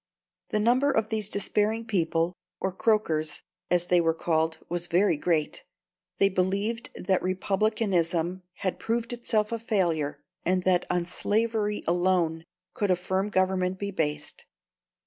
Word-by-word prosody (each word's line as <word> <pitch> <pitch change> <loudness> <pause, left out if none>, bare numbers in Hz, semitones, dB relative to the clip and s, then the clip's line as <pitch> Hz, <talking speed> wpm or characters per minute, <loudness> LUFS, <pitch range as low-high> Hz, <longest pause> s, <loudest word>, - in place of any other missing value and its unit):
The 215 - 0
number 250 +6 +3
of 220 -5 +1
these 215 -2 -1
despairing 215 +3 +1
people 170 -4 0 0.3
or 190 - -1
Croakers, 165 -7 0 0.3
as 175 -1 +2
they 175 0 +4
were 165 -1 +2
called 160 -1 0
was 175 0 -2
very 180 0 +3
great; 165 - -1 0.5
they 195 - +5
believed 200 +5 -1
that 185 0 0
Republicanism 185 -2 0
had 185 - -3
proved 230 +1 -1
itself 220 -3 0
a 230 - -2
failure, 170 -10 0 0.2
and 185 +1 +1
that 180 -1 +2
on 175 -1 +1
slavery 210 +2 0
alone 170 -2 +1 0.3
could 205 - -1
a 185 - +5
firm 190 +3 -1
government 185 -1 +1
be 200 +1 -3
based. 150 -5 -3
185 Hz, 140 wpm, -27 LUFS, 170-210 Hz, 0.5 s, they